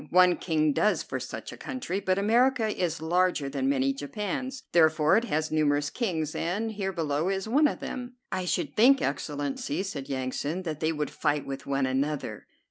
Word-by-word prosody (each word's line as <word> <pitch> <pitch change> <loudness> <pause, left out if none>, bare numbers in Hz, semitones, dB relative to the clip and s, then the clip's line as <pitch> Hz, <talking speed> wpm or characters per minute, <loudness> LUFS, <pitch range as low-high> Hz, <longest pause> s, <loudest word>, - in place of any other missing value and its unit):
One 180 0 +6
king 155 -3 +1
does 210 +7 +2
for - - -4
such - - -6
a - - -10
country; 255 -9 -4
but 185 -2 0
America 230 +3 +3
is 170 -6 -2
larger 175 -3 +1
than 135 -1 -1
many 135 0 +2
Japans, 210 - -4
therefore 160 0 +4
it 230 +3 +2
has 155 -6 -1
numerous 145 -2 +2
kings, 165 - -2
and 205 +7 -1
here 195 -2 -2
below 160 -1 -1
us 195 - +1
is 195 +2 -4
one 290 +7 +4
of - - -4
them." 250 -1 -5 0.2
"I 185 -1 -2
should - - -1
think, 265 +5 +6
Excellency," 145 +3 -2
said 150 -9 -5
Yansan, 140 +6 -2
"that 155 -4 -4
they 160 +1 +1
would 150 -2 -2
fight 145 -2 0
with 135 -1 -6
one 135 -1 +1
another." 140 +3 -2
165 Hz, 190 wpm, -28 LUFS, 145-200 Hz, 0.2 s, One